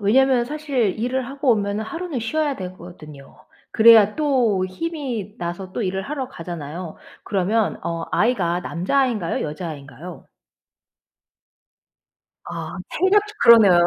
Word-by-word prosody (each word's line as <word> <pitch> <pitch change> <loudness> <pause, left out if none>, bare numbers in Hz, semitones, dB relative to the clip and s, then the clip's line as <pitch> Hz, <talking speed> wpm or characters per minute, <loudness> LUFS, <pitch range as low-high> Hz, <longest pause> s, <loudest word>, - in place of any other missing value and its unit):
왜냐면 245 +4 +3
사실 270 -8 -1
일을 250 +2 -1
하고 275 -1 0
오면은 210 -1 0
하루는 330 -2 -4
쉬어야 290 +4 -1
되거든요. 175 -6 -10 0.3
그래야 220 -2 +7
또 250 -11 +2
힘이 240 - -5
나서 175 +2 -5
또 240 - -2
일을 190 0 -2
하러 265 +3 -4
가잖아요. 165 - -7 0.3
그러면 205 +3 0
어 165 -1 -3
아이가 180 -7 +1
남자 180 +11 -1
아인가요 220 -10 -1
여자 155 +3 -5
아이인가요? 145 +3 -10 2.2
아 - - -6
체력저 415 +2 +2
그러네요. 200 -7 +7
210 Hz, 290 characters per minute, -22 LUFS, 180-265 Hz, 2.2 s, 그래야